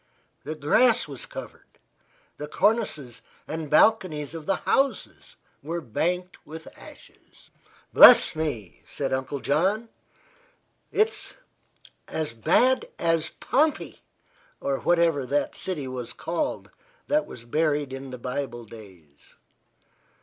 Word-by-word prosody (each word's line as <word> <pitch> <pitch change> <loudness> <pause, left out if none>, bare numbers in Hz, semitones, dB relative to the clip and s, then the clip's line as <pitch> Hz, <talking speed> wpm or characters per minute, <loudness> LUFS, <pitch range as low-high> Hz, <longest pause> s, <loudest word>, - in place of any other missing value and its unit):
The 155 +2 -4
grass 220 - +3
was 140 -4 -7
covered; - - -11 0.6
the 150 - -6
cornices 190 - 0 0.3
and 160 -1 -5
balconies 155 -5 +3
of 160 -2 -8
the 195 - +2
houses 275 - -1 0.3
were 165 +3 -4
banked 180 - -3
with 160 +1 -11
ashes. - - -16 0.4
"Bless - - +9
me!" 120 - -4
said 135 -2 -3
Uncle 130 +1 -3
John. 195 +10 0 1.0
"It's 435 +1 0 0.7
as 155 -7 -3
bad 250 - +2
as 165 -1 0
Pompey, 300 +4 0 0.6
or 135 -1 -2
whatever 170 -5 +2
that 145 +3 0
city 155 -8 -4
was 125 -2 -6
called 165 +1 -3 0.3
that 300 +1 +1
was 115 - -11
buried 145 +1 0
in 135 0 -7
the 125 - -7
Bible 125 -1 -5
days." 95 -10 -15
150 Hz, 115 wpm, -25 LUFS, 130-180 Hz, 1.0 s, Bless